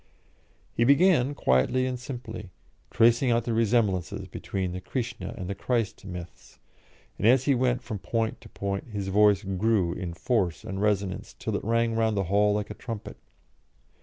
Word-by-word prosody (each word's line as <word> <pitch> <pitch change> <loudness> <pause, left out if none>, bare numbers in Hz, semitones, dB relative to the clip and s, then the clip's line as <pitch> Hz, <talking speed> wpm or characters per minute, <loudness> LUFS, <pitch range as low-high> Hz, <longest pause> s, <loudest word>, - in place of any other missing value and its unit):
He 115 - +2
began 145 0 +4
quietly 65 - +2
and 125 -1 -3
simply, 115 -5 -7 0.4
tracing 120 +3 +4
out 120 -1 +2
the 115 - -2
resemblances 110 -5 +1
between 95 -2 -4
the 90 +1 -5
Krishna 120 +1 -4
and 90 - -5
the 100 - -2
Christ 115 +1 -2
myths, 90 -2 -9 0.6
and - - +2
as 130 +2 +5
he 140 - +3
went 125 -1 +1
from 110 -4 -5
point 115 +3 -2
to - - -13
point 100 0 -3
his 100 -4 -4
voice 105 0 +4
grew 95 -2 +1
in 90 -2 -5
force 95 -4 0
and 100 -3 -4
resonance, 100 -3 -1
till - - -3
it - - -2
rang 115 +1 +1
round 110 -2 +1
the 100 - +2
hall 105 +1 +4
like 105 -1 -3
a - - -3
trumpet. 115 -4 -7
110 Hz, 170 wpm, -27 LUFS, 95-120 Hz, 0.6 s, as